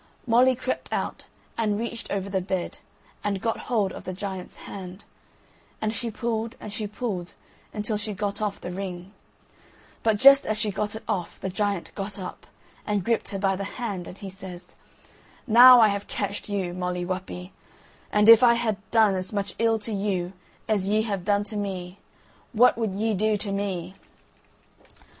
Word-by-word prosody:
Molly 250 Hz, +2 st, +5 dB
crept 255 Hz, -, -4 dB
out -, -, -3 dB, 0.3 s
and 210 Hz, -2 st, +1 dB
reached 235 Hz, +1 st, -5 dB
over 200 Hz, -1 st, -2 dB
the 195 Hz, -1 st, -1 dB
bed, 185 Hz, -1 st, -3 dB, 0.4 s
and 200 Hz, -2 st, -1 dB
got 225 Hz, +3 st, -1 dB
hold 210 Hz, -6 st, +2 dB
of -, -, -8 dB
the 185 Hz, -, -5 dB
giant's 190 Hz, -1 st, -6 dB
hand, 185 Hz, 0 st, -8 dB, 0.8 s
and 215 Hz, 0 st, -1 dB
she 235 Hz, +1 st, -1 dB
pulled 225 Hz, 0 st, -3 dB
and 210 Hz, -, -7 dB
she 210 Hz, -1 st, -2 dB
pulled 205 Hz, -5 st, -4 dB, 0.4 s
until 210 Hz, 0 st, -2 dB
she 210 Hz, 0 st, -2 dB
got 200 Hz, +2 st, -3 dB
off 210 Hz, -2 st, -2 dB
the 180 Hz, -, -6 dB
ring; 185 Hz, 0 st, -6 dB, 0.9 s
but 220 Hz, -2 st, +2 dB
just 275 Hz, +4 st, +7 dB
as 215 Hz, -, +1 dB
she 215 Hz, -1 st, 0 dB
got 210 Hz, +2 st, -2 dB
it 220 Hz, -, -7 dB
off 175 Hz, -4 st, -3 dB
the 190 Hz, -, -4 dB
giant 200 Hz, -1 st, -2 dB
got 200 Hz, 0 st, -5 dB
up, 185 Hz, -2 st, -8 dB, 0.4 s
and 205 Hz, -3 st, -1 dB
gripped 230 Hz, +2 st, 0 dB
her 200 Hz, -, -3 dB
by 195 Hz, 0 st, +1 dB
the 200 Hz, -, -4 dB
hand, 200 Hz, -8 st, -4 dB
and 180 Hz, -, -9 dB
he 200 Hz, -, -7 dB
says: 185 Hz, -2 st, -9 dB, 0.7 s
"Now 250 Hz, +1 st, +9 dB
I 220 Hz, -2 st, +7 dB
have 200 Hz, 0 st, -3 dB
catcht 200 Hz, +1 st, -3 dB
you, 190 Hz, -4 st, -2 dB
Molly 180 Hz, 0 st, -2 dB
Whuppie, 185 Hz, 0 st, -5 dB, 0.6 s
and, 210 Hz, 0 st, +4 dB
if 230 Hz, -1 st, +10 dB
I 235 Hz, -1 st, +6 dB
had 230 Hz, -3 st, 0 dB
done 220 Hz, -3 st, +4 dB
as 185 Hz, 0 st, -3 dB
much 200 Hz, -1 st, -2 dB
ill 225 Hz, 0 st, +3 dB
to 220 Hz, +1 st, -4 dB
you 195 Hz, -3 st, -1 dB, 0.3 s
as 200 Hz, -3 st, +1 dB
ye 215 Hz, +1 st, +3 dB
have 200 Hz, -5 st, -3 dB
done 205 Hz, +2 st, +2 dB
to 210 Hz, +1 st, -5 dB
me, 190 Hz, -2 st, -4 dB, 0.5 s
what 245 Hz, +3 st, +6 dB
would 220 Hz, -4 st, -2 dB
ye 220 Hz, +2 st, 0 dB
do 215 Hz, +2 st, +2 dB
to 205 Hz, 0 st, -2 dB
me?" 190 Hz, -3 st, -3 dB
205 Hz, 180 wpm, -26 LUFS, 190-220 Hz, 0.9 s, if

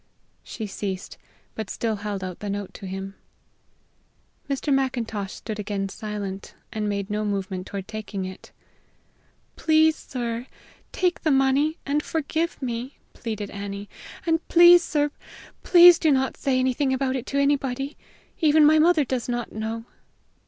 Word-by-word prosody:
She 220 Hz, -, -6 dB
ceased, 195 Hz, -1 st, -5 dB, 0.3 s
but 220 Hz, -, -5 dB
still 225 Hz, -2 st, -2 dB
held 200 Hz, -1 st, -4 dB
out 185 Hz, -2 st, -6 dB
the 205 Hz, -, -5 dB
note 200 Hz, -1 st, -4 dB
to 195 Hz, -, -8 dB
him. 195 Hz, +1 st, -5 dB, 1.4 s
Mr. 280 Hz, +1 st, 0 dB
Macintosh 230 Hz, -7 st, -1 dB
stood 215 Hz, -2 st, -6 dB
again 200 Hz, -1 st, -2 dB
silent, 200 Hz, -2 st, -6 dB, 0.2 s
and 215 Hz, -1 st, -1 dB
made 200 Hz, 0 st, -3 dB
no 210 Hz, +1 st, -1 dB
movement 195 Hz, -2 st, -3 dB
toward 195 Hz, -1 st, -6 dB
taking 215 Hz, -3 st, -5 dB
it. 185 Hz, +1 st, -9 dB, 1.1 s
"Please, 315 Hz, 0 st, +4 dB
sir, 240 Hz, -3 st, -4 dB, 0.4 s
take 360 Hz, -1 st, 0 dB
the 315 Hz, -, +1 dB
money, 275 Hz, +3 st, +3 dB
and 290 Hz, +2 st, +1 dB
forgive 320 Hz, +2 st, -2 dB
me," 245 Hz, +2 st, -4 dB, 0.2 s
pleaded 215 Hz, -3 st, -5 dB
Annie. 200 Hz, 0 st, -6 dB, 0.4 s
"And 325 Hz, -1 st, +2 dB
please, 345 Hz, 0 st, +8 dB
sir, 295 Hz, -2 st, 0 dB, 0.5 s
please 350 Hz, -1 st, +8 dB
do 315 Hz, -, +3 dB
not 265 Hz, -2 st, +2 dB
say 265 Hz, -2 st, 0 dB
anything 260 Hz, +1 st, +1 dB
about 260 Hz, 0 st, -1 dB
it 260 Hz, -1 st, -4 dB
to 280 Hz, -, -2 dB
anybody. 280 Hz, -1 st, 0 dB, 0.4 s
Even 310 Hz, -1 st, +5 dB
my 310 Hz, +1 st, +6 dB
mother 320 Hz, -2 st, +4 dB
does 250 Hz, -1 st, -3 dB
not 240 Hz, -1 st, -2 dB
know." 225 Hz, +1 st, -4 dB
240 Hz, 145 wpm, -25 LUFS, 205-290 Hz, 1.4 s, please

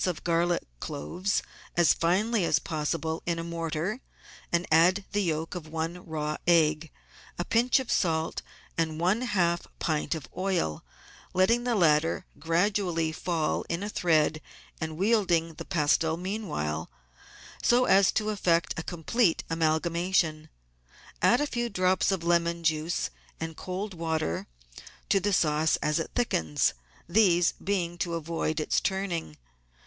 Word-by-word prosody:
of 175 Hz, -4 st, -3 dB
garlic 170 Hz, 0 st, +1 dB, 0.2 s
cloves 180 Hz, -, -2 dB, 0.3 s
as 175 Hz, -2 st, +6 dB
finely 200 Hz, +5 st, +1 dB
as 155 Hz, -, +3 dB
possible 160 Hz, +1 st, -2 dB
in 170 Hz, -1 st, 0 dB
a 165 Hz, -, -3 dB
mortar, 170 Hz, +6 st, -3 dB, 0.5 s
and 170 Hz, +1 st, +1 dB
add 180 Hz, +5 st, +4 dB
the 205 Hz, -, +1 dB
yolk 160 Hz, -3 st, -2 dB
of 175 Hz, -3 st, -6 dB
one 165 Hz, +3 st, -4 dB
raw 150 Hz, -1 st, -2 dB
egg, 160 Hz, -2 st, +3 dB, 0.5 s
a 175 Hz, -, -2 dB
pinch 240 Hz, +3 st, +3 dB
of 260 Hz, -, -4 dB
salt, 160 Hz, -3 st, 0 dB, 0.4 s
and 160 Hz, -1 st, 0 dB
one 185 Hz, +7 st, +2 dB
half 175 Hz, -8 st, 0 dB
pint 155 Hz, 0 st, -1 dB
of 155 Hz, -5 st, -7 dB
oil, 185 Hz, -, -1 dB, 0.5 s
letting 230 Hz, +7 st, +3 dB
the 245 Hz, -2 st, +1 dB
latter 165 Hz, -4 st, +3 dB
gradually 170 Hz, 0 st, +1 dB
fall 160 Hz, -1 st, -1 dB
in 170 Hz, +3 st, -2 dB
a 205 Hz, -, -3 dB
thread 155 Hz, -5 st, +2 dB, 0.4 s
and 160 Hz, -1 st, -4 dB
wielding 180 Hz, -5 st, +2 dB
the 155 Hz, -, -8 dB
pestle 160 Hz, +1 st, +1 dB
meanwhile, 170 Hz, -, -3 dB, 0.7 s
so 245 Hz, +1 st, +4 dB
as 195 Hz, -4 st, +5 dB
to 215 Hz, 0 st, 0 dB
effect 170 Hz, -6 st, +1 dB
a -, -, -1 dB
complete 175 Hz, -, +1 dB
amalgamation. 165 Hz, 0 st, +1 dB, 0.7 s
Add 240 Hz, -, +5 dB
a -, -, +2 dB
few 240 Hz, -4 st, -2 dB
drops 185 Hz, -1 st, +2 dB
of 190 Hz, -3 st, -1 dB
lemon 170 Hz, 0 st, +1 dB
juice 160 Hz, +1 st, 0 dB, 0.3 s
and 160 Hz, 0 st, -5 dB
cold 190 Hz, +4 st, -5 dB
water 160 Hz, -, -2 dB, 0.6 s
to 195 Hz, -, +4 dB
the 205 Hz, +2 st, 0 dB
sauce 155 Hz, -3 st, +2 dB
as 150 Hz, +1 st, 0 dB
it 165 Hz, -, -3 dB
thickens, 80 Hz, -, +1 dB, 0.3 s
these 175 Hz, -2 st, +4 dB
being 175 Hz, -3 st, -1 dB
to 170 Hz, -1 st, -1 dB
avoid 165 Hz, -1 st, -2 dB
its 155 Hz, -, +1 dB
turning. 185 Hz, -, -2 dB
170 Hz, 140 wpm, -28 LUFS, 160-190 Hz, 0.7 s, as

